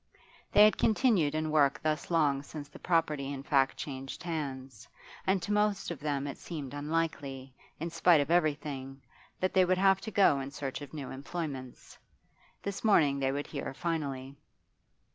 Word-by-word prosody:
They 210 - +7
had 215 - +3
continued 215 - +3
in 155 0 -1
work 145 -3 +3
thus 155 -1 -1
long 150 -5 +2
since 145 0 -8
the - - -13
property 150 -5 0
in 135 -1 -5
fact 135 -2 +2
changed 135 +2 -6
hands, 135 -8 -5 0.4
and 190 -2 +2
to - - -3
most 210 -3 +1
of 165 - -6
them 145 -1 -2
it 140 - -6
seemed 145 -6 -6
unlikely, 145 -3 -3 0.3
in 165 +2 -4
spite 170 -1 +5
of 145 +2 0
every 155 -4 +4
thing, 135 -2 -7 0.4
that 185 - 0
they 185 - +5
would 185 0 +2
have 195 0 +4
to - - -5
go 190 -9 +4
in 135 0 -4
search 140 -1 -5
of 145 - -9
new 145 -4 -6
employments. 135 -2 -6 0.6
This 200 -1 -4
morning 150 -10 +4
they 135 -1 +1
would 145 +1 -3
hear - - -5
finally. 140 -5 -3
150 Hz, 175 wpm, -31 LUFS, 135-170 Hz, 0.6 s, They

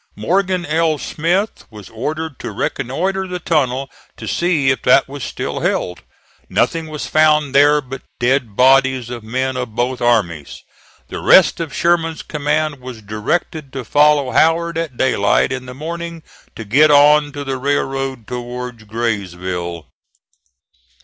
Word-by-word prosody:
Morgan 185 - 0
L. 160 0 +1
Smith 175 +9 -2
was 105 -3 -12
ordered 150 +5 -5
to - - -5
reconnoitre 190 +9 -2
the 180 0 -4
tunnel 140 -6 0 0.3
to - - -8
see 160 -6 +1
if 130 - -2
that 130 +2 +4
was 140 -1 -7
still - - -4
held. 90 - -2 0.5
Nothing 165 -1 0
was 155 -1 -5
found 150 -2 +3
there 145 +1 +5
but 135 0 -8 0.2
dead 125 -3 0
bodies 130 -1 +3
of 120 -1 -6
men 130 +4 -2
of 125 -4 -5
both 125 +1 -1
armies. 100 -12 0 0.5
The - - -5
rest - - +5
of 165 -3 -4
Sherman's 165 -1 0
command 150 0 -1
was 125 -3 -9
directed 130 - -3
to 135 -3 -5
follow 145 -2 +3
Howard 170 +1 +2
at 165 -7 -4
daylight 105 -2 +2
in 130 -1 -5
the 125 - -8
morning 170 +2 -6 0.3
to 115 - -7
get 145 +9 +4
on 145 0 +5
to 145 - -5
the 135 -1 -3
railroad 135 -2 -2
towards 125 -1 -6
Graysville. 90 -6 -3
135 Hz, 145 wpm, -18 LUFS, 120-155 Hz, 0.5 s, there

